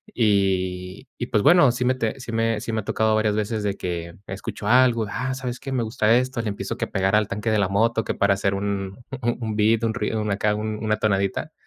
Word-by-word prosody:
Y 95 Hz, -1 st, 0 dB
y 120 Hz, -, -3 dB
pues, 105 Hz, -4 st, +1 dB
bueno, 175 Hz, -6 st, +6 dB
sí 125 Hz, -, -2 dB
me 125 Hz, +1 st, +3 dB
te 115 Hz, 0 st, -2 dB
sí 120 Hz, -, -7 dB
me 115 Hz, -1 st, 0 dB
sí 115 Hz, -, -4 dB
me 110 Hz, -, -1 dB
ha 105 Hz, -, -6 dB
tocado 110 Hz, 0 st, +1 dB
varias 110 Hz, -1 st, +1 dB
veces 110 Hz, 0 st, -1 dB
de 100 Hz, -1 st, 0 dB
que 85 Hz, -2 st, -5 dB
escucho 95 Hz, +2 st, -6 dB
algo: 120 Hz, -1 st, +4 dB
"Ah, 130 Hz, +3 st, -2 dB
¿sabes 125 Hz, -2 st, -5 dB
qué?, 135 Hz, -1 st, -5 dB
me 120 Hz, -3 st, 0 dB
gusta 110 Hz, 0 st, +2 dB
esto", 130 Hz, 0 st, -1 dB
le 115 Hz, -, -5 dB
empiezo 100 Hz, -, -4 dB
que -, -, -2 dB
pegar 95 Hz, +1 st, 0 dB
al 105 Hz, -1 st, +1 dB
tanque 105 Hz, +2 st, -2 dB
de 110 Hz, -, +2 dB
la 100 Hz, -, +2 dB
moto, 115 Hz, +3 st, +1 dB
que -, -, -1 dB
para 100 Hz, 0 st, +2 dB
hacer 100 Hz, 0 st, 0 dB
un 100 Hz, +2 st, -3 dB, 0.2 s
un 115 Hz, -2 st, -2 dB
beat, 110 Hz, +2 st, +3 dB
un 110 Hz, -, +1 dB
ruido, 110 Hz, -2 st, -2 dB
una 105 Hz, -2 st, 0 dB
acá, 105 Hz, 0 st, +1 dB
una 110 Hz, 0 st, -1 dB
tonadita. 100 Hz, -2 st, 0 dB
110 Hz, 235 wpm, -23 LUFS, 100-115 Hz, 0.2 s, bueno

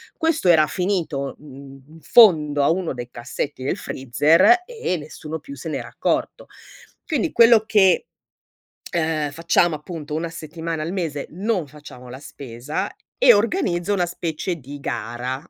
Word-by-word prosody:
Questo 320 Hz, -, 0 dB
era 160 Hz, -3 st, +5 dB
finito, 170 Hz, -8 st, -2 dB
mhmm, 135 Hz, -1 st, -13 dB
in 160 Hz, +1 st, -16 dB
fondo 150 Hz, -7 st, +5 dB
a -, -, +3 dB
uno 175 Hz, -1 st, -1 dB
dei 120 Hz, -1 st, -7 dB
cassetti 130 Hz, +3 st, -5 dB
del 135 Hz, -, -1 dB
freezer 155 Hz, -, +3 dB
e 455 Hz, -, -3 dB
nessuno 155 Hz, +1 st, -7 dB
più 280 Hz, -, -10 dB
se -, -, -7 dB
n'era -, -, -4 dB
accorto. -, -, -2 dB, 0.6 s
Quindi 320 Hz, 0 st, -1 dB
quello 230 Hz, -2 st, +6 dB
che, 205 Hz, -, +3 dB, 0.9 s
uhm, 160 Hz, -3 st, 0 dB
facciamo 165 Hz, +2 st, +2 dB
appunto 150 Hz, -1 st, -7 dB
una 165 Hz, +2 st, -2 dB
settimana 165 Hz, 0 st, -5 dB
al 165 Hz, +4 st, -4 dB
mese 160 Hz, -7 st, -3 dB
non 190 Hz, -1 st, -2 dB
facciamo 140 Hz, -3 st, -13 dB
la 130 Hz, -, -8 dB
spesa, 140 Hz, -, -6 dB, 0.2 s
e 250 Hz, -, +7 dB
organizzo 205 Hz, -, 0 dB
una 180 Hz, -3 st, +1 dB
specie 170 Hz, 0 st, -4 dB
di 145 Hz, 0 st, -10 dB
gara 120 Hz, +2 st, -4 dB
160 Hz, 145 wpm, -22 LUFS, 145-185 Hz, 0.9 s, e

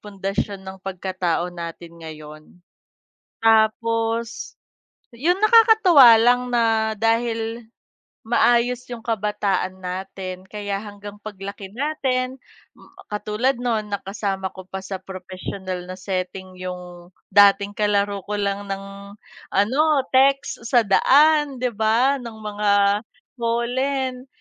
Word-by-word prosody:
pundasyon 195 Hz, -1 st, -4 dB
ng 190 Hz, 0 st, -9 dB
pagkatao 185 Hz, -2 st, -2 dB
natin 170 Hz, 0 st, -9 dB
ngayon. 155 Hz, -1 st, -10 dB, 1.0 s
Tapos, 225 Hz, +1 st, +1 dB, 0.6 s
'yung 345 Hz, +10 st, +1 dB
nakakatuwa 430 Hz, -, +7 dB
lang 245 Hz, +2 st, +3 dB
na 225 Hz, -2 st, +1 dB
dahil, 225 Hz, 0 st, 0 dB, 0.7 s
maayos 240 Hz, +1 st, +2 dB
yung 235 Hz, -, -5 dB
kabataan 205 Hz, -3 st, -1 dB
natin 185 Hz, 0 st, -6 dB
kaya 205 Hz, -1 st, -4 dB
hanggang 205 Hz, 0 st, -10 dB
paglaki 200 Hz, -1 st, -8 dB
natin 260 Hz, -1 st, -1 dB, 0.7 s
katulad 210 Hz, +5 st, -1 dB
noon 230 Hz, -3 st, -2 dB
na 200 Hz, -1 st, -4 dB
kasama 195 Hz, -1 st, -3 dB
ko 185 Hz, -1 st, -12 dB
pa 190 Hz, 0 st, -6 dB
sa 190 Hz, -1 st, -5 dB
professional 185 Hz, -1 st, -7 dB
na 185 Hz, -, -6 dB
setting 185 Hz, 0 st, -4 dB
yung 180 Hz, -1 st, -8 dB, 0.2 s
dating 200 Hz, 0 st, +5 dB
kalaro 205 Hz, -1 st, 0 dB
ko 210 Hz, -, -2 dB
lang 200 Hz, 0 st, -2 dB
ng 195 Hz, +1 st, -7 dB, 0.4 s
ano 215 Hz, +8 st, +2 dB, 0.3 s
text 275 Hz, +2 st, +3 dB
sa 240 Hz, -2 st, +4 dB
daan 295 Hz, +7 st, +4 dB
'di 250 Hz, 0 st, -2 dB
ba, 230 Hz, +6 st, +2 dB
ng 235 Hz, -2 st, -8 dB
mga 210 Hz, -1 st, -1 dB, 0.7 s
holen 255 Hz, +3 st, -1 dB
210 Hz, 110 wpm, -22 LUFS, 190-240 Hz, 1.0 s, nakakatuwa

